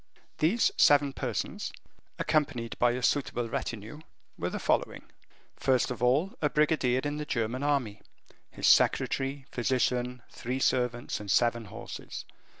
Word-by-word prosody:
These 190 +10 +3
seven 145 -1 +5
persons, 125 -5 -3 0.5
accompanied 140 -7 0
by 120 0 +4
a 125 0 -4
suitable 120 -4 0
retinue, 115 +4 -5 0.4
were - - -2
the - - -4
following: - - -1 0.4
First 130 -1 +1
of 125 - -5
all, 140 +10 +2
a 150 - +2
brigadier 140 -5 +2
in 145 0 -2
the 150 - -3
German 115 +1 -1
army, 135 -8 0 0.5
his - - -4
secretary, 135 0 +3
physician, 125 0 0
three 125 +2 -4
servants, 125 -2 0
and 105 -1 -8
seven 115 +2 +2
horses. 115 +4 -8
125 Hz, 135 wpm, -29 LUFS, 120-145 Hz, 0.5 s, seven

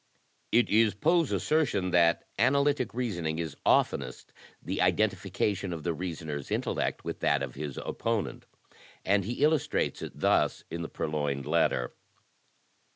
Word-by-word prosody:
It 120 +1 +4
is 110 -2 +3
Poe's 165 - +2
assertion 120 - +1
that 85 -1 +3
analytic 140 0 +2
reasoning 85 -11 -2
is 80 -4 -4
oftenest 65 - +1 0.3
the - - -3
identification 100 -2 0
of 80 -3 -5
the 85 - 0
reasoner's 80 -4 -5
intellect - - -1
with - - -4
that 70 -1 +2
of 65 -3 -5
his 70 -1 -6
oppo 115 -2 -1
nent, - - -9 0.6
and 100 0 +3
he 120 +6 -2
illustrates 155 -2 +1
it - - -7
thus, - - +2
in 85 - -4
"The 85 - -5
Purloined 75 -3 -2
Letter." 60 -1 +1
90 Hz, 140 wpm, -29 LUFS, 75-120 Hz, 0.6 s, It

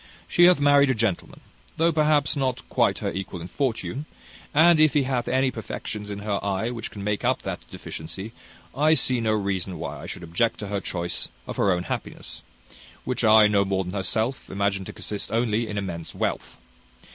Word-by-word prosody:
She 175 - +5
hath 180 -3 +6
married 145 -1 +5
a 130 - +2
gentleman, 110 -5 -2 0.4
though 165 +1 +3
perhaps 150 -2 +3
not 130 -2 -2
quite - - +2
her - - 0
equal 95 -2 -5
in 85 - -7
fortune; 135 - -2 0.4
and 160 +2 +6
if 155 -3 +5
he 145 - +4
hath 130 -2 -1
any 130 0 +2
perfections 105 -2 -6
in 100 0 -5
her 100 -2 -1
eye 100 +3 -1
which 115 -2 -5
can 100 - -8
make 105 0 -1
up - - +1
that - - -6
deficiency, 95 +7 -7 0.4
I 155 +3 +4
see 125 -5 +2
no 110 -1 +1
reason 95 -3 -1
why 70 0 -5
I - - -8
should 90 - -6
object 85 +8 0
to 100 - -5
her 100 -1 -2
choice 85 -2 -2 0.2
of - - -6
her 100 - +3
own 90 -1 0
happiness; - - -5 0.6
which 125 -1 -2
I, 110 -1 +7
no 100 -1 +3
more 95 -1 0
than 90 +1 -6
herself, 110 +6 -1
imagine 100 0 -1
to - - -8
consist 105 -1 -4
only 115 0 +1
in 105 - -4
immense 85 -5 -5
wealth. - - -3
110 Hz, 195 wpm, -25 LUFS, 95-130 Hz, 0.6 s, I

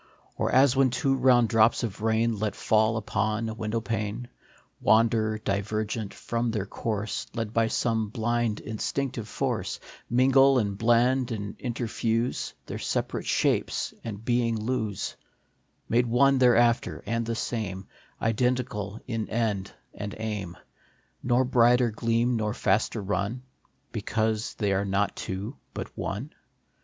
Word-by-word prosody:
Or - - -1
as 135 0 +5
when 135 -1 +4
two 135 +2 +1
round 125 -3 +4
drops 115 +2 +4
of 110 -2 -4
rain, 110 0 +1
Let 105 0 -1
fall 110 +1 +2
upon 110 +1 -1
a - - -4
window 110 +1 -2
pane, 110 +2 -3 0.5
Wander, 110 -1 +3
divergent, 105 +1 -2
from 120 0 -2
their 105 -4 -2
course, 105 0 -3
Led 115 -2 -3
by 115 -1 +3
some 110 -1 0
blind, 115 0 -1
instinctive 115 +1 -3
force, - - -2 0.3
Mingle 135 +2 +5
and 100 -4 0
blend 120 +3 +3
and 105 -2 -4
interfuse, 115 -1 -1
Their - - -6
separate - - -2
shapes - - +1
and 110 -1 -6
being 120 -1 +1
lose, 110 -3 -2 0.7
Made 120 +2 +2
one 135 +3 +4
thereafter 120 - +3
and 115 +3 -1
the 115 0 -2
same, 100 -5 -3 0.3
Identical 115 -3 -1
in 115 -3 -3
end 105 -4 -1 0.2
and 105 0 -6
aim, 105 -6 -4 0.6
Nor 125 +1 +2
brighter 125 -1 +4
gleam, 115 +2 +1
nor 105 -1 -1
faster 105 +2 +1
run, 105 +5 -2 0.5
Because 110 0 -1
they 100 -3 0
are 95 +1 +1
not 100 +1 0
two, 100 +8 -5 0.2
but - - -6
one 110 +10 -4
115 Hz, 135 wpm, -27 LUFS, 105-120 Hz, 0.7 s, as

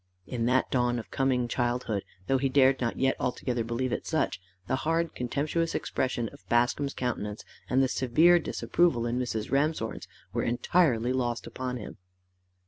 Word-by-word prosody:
In 115 -2 -2
that 130 +1 +2
dawn 120 -1 +2
of 115 - -7
coming 130 -2 +1
childhood, 120 -4 -1 0.2
though 135 +4 +2
he 135 0 +1
dared 130 -1 +4
not 120 -1 -1
yet 135 0 +2
altogether 125 -1 -1
believe 120 +3 -2
it - - -3
such, 155 - 0 0.2
the 130 - 0
hard 165 +3 0
contemptuous 150 +6 -1
expression 125 -3 -1
of - - -16
Bascombe's 120 +4 +1
countenance, 105 -4 -3 0.2
and 130 +1 +3
the - - +3
severe 160 +8 +4
disapproval 165 -6 +1
in 120 +1 -1
Mrs. 110 -4 -3
Ramshorn's, 150 +4 0 0.3
were - - 0
entirely 120 -1 +2
lost 120 -2 -1
upon 125 -1 -4
him. 110 - -8
125 Hz, 160 wpm, -28 LUFS, 120-135 Hz, 0.3 s, dared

